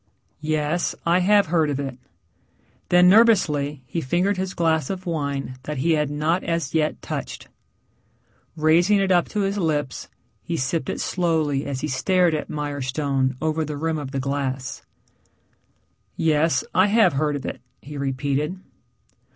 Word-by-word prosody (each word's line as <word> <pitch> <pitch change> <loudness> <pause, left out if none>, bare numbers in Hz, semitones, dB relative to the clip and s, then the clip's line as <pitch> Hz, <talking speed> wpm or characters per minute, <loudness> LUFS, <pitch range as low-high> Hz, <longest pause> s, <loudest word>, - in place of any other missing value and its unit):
"Yes. 155 +2 -1
I 170 +2 +4
have 200 +2 +4
heard 160 -2 +1
of 140 -1 -2
it." 135 -3 -5 0.9
Then 180 0 +6
nervously 165 - +4
he 165 +7 -3
fingered 180 +9 +1
his 185 0 -4
glass 160 -1 +1
of 190 -1 -5
wine 140 -6 -3
that 150 -1 -4
he 165 +6 +1
had 150 -2 +1
not 155 +5 0
as 165 -4 -2
yet 155 -1 0
touched. - - -6 1.1
Raising 170 +6 +4
it 195 -1 +1
up 175 -1 +3
to 210 - -1
his 200 +1 -1
lips 150 -6 -2 0.3
he 170 - -3
sipped 135 +2 -1
it - - -3
slowly 160 -6 0
as 135 -2 -3
he - - -2
stared 180 +5 +2
at 155 - -3
Mirestone 140 -2 -1
over 160 0 0
the 150 -1 -5
rim 160 +1 -1
of 145 -3 -6
the 135 0 -3
glass. 135 -1 -3 1.4
"Yes. 160 +4 +2
I 185 +2 +4
have 210 -4 +4
heard 150 +1 0
of 140 - -5
it," - - -5 0.2
he 150 +1 -10
repeated. 140 +5 -2
155 Hz, 155 wpm, -23 LUFS, 140-175 Hz, 1.4 s, Then